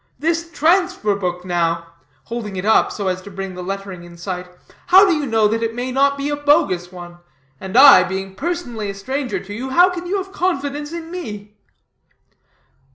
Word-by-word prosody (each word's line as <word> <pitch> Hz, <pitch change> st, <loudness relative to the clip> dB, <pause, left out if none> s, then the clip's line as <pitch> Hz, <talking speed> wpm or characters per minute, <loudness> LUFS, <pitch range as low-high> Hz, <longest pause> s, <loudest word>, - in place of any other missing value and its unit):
This 330 Hz, +4 st, -1 dB
transfer 345 Hz, -, +2 dB
book, 180 Hz, -2 st, -4 dB
now," 170 Hz, -2 st, 0 dB, 0.4 s
holding 225 Hz, -4 st, -6 dB
it 185 Hz, +1 st, -4 dB
up 220 Hz, -, +4 dB
so 200 Hz, -2 st, -4 dB
as 185 Hz, 0 st, -1 dB
to 200 Hz, -, -11 dB
bring 195 Hz, -1 st, -6 dB
the 180 Hz, -, -7 dB
lettering 195 Hz, -1 st, -6 dB
in 170 Hz, 0 st, -13 dB
sight, 180 Hz, +1 st, -5 dB, 0.4 s
"how 380 Hz, +3 st, +8 dB
do 365 Hz, -, +3 dB
you 295 Hz, -2 st, -2 dB
know 225 Hz, -2 st, +3 dB
that 225 Hz, +2 st, -1 dB
it 230 Hz, 0 st, -2 dB
may 250 Hz, +1 st, -3 dB
not 280 Hz, +2 st, +2 dB
be 280 Hz, +1 st, -2 dB
a 290 Hz, -, 0 dB
bogus 290 Hz, -, +1 dB
one? 175 Hz, -1 st, -11 dB, 0.4 s
And 190 Hz, +4 st, -3 dB
I, 275 Hz, -6 st, +9 dB
being 190 Hz, +1 st, -4 dB
personally 245 Hz, -, -4 dB
a 200 Hz, -, -5 dB
stranger 260 Hz, +6 st, -3 dB
to 205 Hz, +1 st, -9 dB
you, 255 Hz, +5 st, -5 dB
how 355 Hz, +7 st, +5 dB
can 355 Hz, 0 st, -6 dB
you 395 Hz, +3 st, 0 dB
have 385 Hz, 0 st, -5 dB
confidence 295 Hz, -6 st, -2 dB
in 335 Hz, -1 st, -7 dB
me?" 210 Hz, -, -7 dB
225 Hz, 195 wpm, -19 LUFS, 190-295 Hz, 0.4 s, I